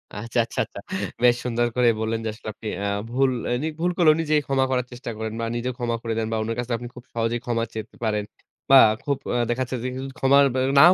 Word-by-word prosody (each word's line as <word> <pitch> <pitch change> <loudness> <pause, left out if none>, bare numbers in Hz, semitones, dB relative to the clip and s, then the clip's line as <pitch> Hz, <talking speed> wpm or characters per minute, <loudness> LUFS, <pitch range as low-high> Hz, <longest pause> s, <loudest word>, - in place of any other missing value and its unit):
আচ্ছা, 115 +3 -2
আচ্ছা, - - -6
আচ্ছা। - - -10 0.4
বেশ 120 -1 +6
সুন্দর 120 0 +1
করে 125 -1 +4
বললেন 110 0 -1
যে 110 - 0
আসলে 110 0 -8
আপনি 110 - -9
অ্যা 100 0 -1 0.2
ভুল 130 +2 +2 0.2
এ - - -1
নিভুল 160 +3 -1
করলেও 155 -3 +6
নিজেকেই 150 -2 +2
ক্ষমা 135 -1 +2
করার 125 -1 +1
চেষ্টা 120 0 -7
করেন 110 0 -4
বা 115 - -1
নিজেও 125 +1 -2
ক্ষমা 120 -1 -1
করে 115 -2 -2
দেন 110 -1 0
বা 110 - 0
উনার 115 +1 -3
কাছে 120 0 -4
আপনি 120 +1 -7
খুব 125 - -10
সহজেই 115 +1 0
ক্ষমা 115 -1 0
চেতে 110 -1 -7
পারেন। 105 -2 0 0.5
বা 135 - +8 0.3
খুব 140 -2 0
অ্যা 120 -1 +1
দেখা 120 +2 0
যাচ্ছে 130 - -4
যে 130 - -1
কিছু 135 +1 -5
ক্ষমা 135 +1 +4 0.4
নাও 175 +5 +9
120 Hz, 235 wpm, -24 LUFS, 115-135 Hz, 0.5 s, নাও